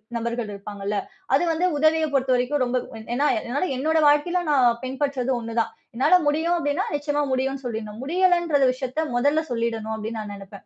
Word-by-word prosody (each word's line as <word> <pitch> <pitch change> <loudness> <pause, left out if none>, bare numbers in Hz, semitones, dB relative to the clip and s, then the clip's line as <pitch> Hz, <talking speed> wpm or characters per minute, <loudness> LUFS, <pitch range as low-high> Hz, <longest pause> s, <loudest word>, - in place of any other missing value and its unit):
நபர்கள் 235 -1 -2
இருப்பாங்கல்ல. 200 0 -5 0.4
அது 285 - +4
வந்து 325 +3 0
உதவிய 315 +1 +3
பொறுத்தவரைக்கும் 260 +1 +1
ரொம்ப 255 0 0 0.4
என்னா 285 +4 +2 0.2
என்னால 285 +8 0
என்னோட 315 +4 +1
வாழ்க்கையில 295 +5 +3
நான் 245 -5 +3
பின்பற்றுறது 265 -1 -1
ஒண்ணுதான். 230 0 -2 0.2
என்னால 270 +9 +4
முடியும் 320 +4 +2
அப்டின்னா 315 +4 -1
நிச்சியமா 290 0 -1
முடியும்னு 270 +1 -1
சொல்லிடுனும். 220 -2 -5
முடியலன்ற 345 -1 +2
விஷயத்த 260 +4 -3
முதல்ல 290 +6 +2
சொல்லிடணும் 225 -2 -2
அப்டின்னு 220 +1 -5
நான் 210 -1 -6
நெனைப்பேன். 195 0 -12
265 Hz, 150 wpm, -24 LUFS, 230-295 Hz, 0.4 s, அது